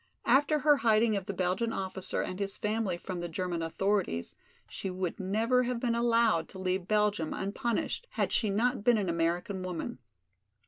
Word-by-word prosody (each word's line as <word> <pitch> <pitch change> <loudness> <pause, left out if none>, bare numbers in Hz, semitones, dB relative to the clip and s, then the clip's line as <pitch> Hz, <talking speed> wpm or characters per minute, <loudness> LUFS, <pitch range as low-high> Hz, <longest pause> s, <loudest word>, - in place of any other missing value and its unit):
After 290 +3 +4
her 295 0 +4
hiding 225 -2 +3
of 195 -2 -3
the 200 - -2
Belgian 185 +6 0
officer 190 -2 -2
and 185 - -5
his 195 -1 -2
family 210 -4 -1
from 180 0 -5
the 175 0 -4
German 175 0 -2
authorities, 170 - -1 0.3
she 195 - -5
would 185 -1 -3
never 220 +6 +2
have 250 -1 -1
been 235 -1 0
allowed 230 -7 +2
to - - -9
leave 185 -1 -1
Belgium 210 -6 +1
unpunished 225 - -2
had - - 0
she 215 - +2
not 230 +3 +1
been 240 0 +5
an 195 -4 -1
American 170 +3 -1
woman. 180 -7 -4
200 Hz, 175 wpm, -30 LUFS, 185-230 Hz, 0.3 s, been